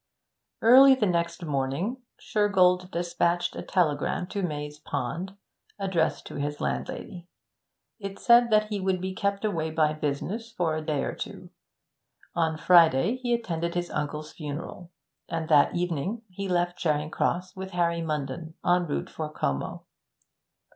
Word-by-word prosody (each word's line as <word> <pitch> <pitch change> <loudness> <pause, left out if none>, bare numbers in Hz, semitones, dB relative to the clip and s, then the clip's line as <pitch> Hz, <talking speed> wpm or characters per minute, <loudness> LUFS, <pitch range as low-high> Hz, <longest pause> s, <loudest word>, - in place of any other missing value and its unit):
Early 265 +4 +9
the 230 - +1
next 170 -1 -1
morning 145 - -1 0.2
Shergold 185 -3 +2
despatched 175 0 0
a - - -4
telegram 175 0 0
to 200 - -3
Maze 150 -3 -4
Pond, 150 +7 -4 0.4
addressed 190 -5 0
to - - -7
his 145 +1 -3
landlady. 175 -1 -4 0.7
It 195 -1 -6
said 240 0 +5
that 215 -1 +3
he 205 -2 -2
would 190 -1 0
be 190 +1 -3
kept 200 +2 -1
away 165 -6 -1
by 155 -1 +2
business 155 +10 -3
for 170 -7 0
a 155 - -2
day 150 -2 -1
or - - -2
two. - - -8 0.8
On 160 -2 0
Friday 170 - +5
he 250 -1 -3
attended 170 -7 -3
his 175 0 -2
uncle's 150 +1 -4
funeral, 155 +3 -7 0.4
and 165 -1 -2
that 145 -2 +5
evening 180 +6 -2
he 195 +1 -5
left 175 0 0
Charing 150 -1 0
Cross 180 +1 -1
with 190 0 -6
Harvey 170 -1 +1
Munden, 155 +1 -4
en 175 0 +3
route 145 - -2
for 155 -1 -5
Como. 70 - -3
175 Hz, 145 wpm, -27 LUFS, 155-190 Hz, 0.8 s, Early